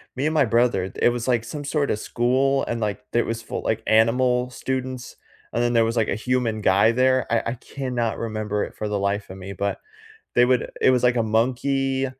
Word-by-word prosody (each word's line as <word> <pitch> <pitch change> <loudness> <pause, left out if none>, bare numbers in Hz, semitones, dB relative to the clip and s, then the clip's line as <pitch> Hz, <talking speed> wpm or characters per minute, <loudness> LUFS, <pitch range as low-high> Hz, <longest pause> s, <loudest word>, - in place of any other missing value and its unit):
me 135 +3 -2
and 155 - +1
my 150 -4 +4
brother, 115 -5 +1
it - - +3
was, 120 0 -3
like, 120 -3 +2
some 145 +5 -6
sorta 140 -5 0
school 130 +5 +1
and, 115 - -2
like, 105 -2 -3
it 120 - +2
was 115 0 -3
for, - - -5
like, 110 0 -2
animal 125 +3 +3
students, 130 0 -5 0.3
and 120 - -1
then 120 0 +1
there 115 -1 +4
was, 115 +1 -2
like, 110 - +2
a - - -1
human 115 -1 -1
guy 100 +3 +4
there, 130 +1 +2
I 115 0 +2
I - - -3
cannot 125 -3 -3
remember 110 -2 -2
it - - -7
for 105 - -4
the 105 -1 -1
life 100 +1 -1
of 95 - -9
me, 95 +1 -8
but 100 +1 -2 0.6
they 120 - +6
would 125 -1 +1
it - - +6
was, 125 -1 +2
like, 125 0 +3
a 115 - +2
monkey 130 +4 0
120 Hz, 220 wpm, -23 LUFS, 110-130 Hz, 0.6 s, they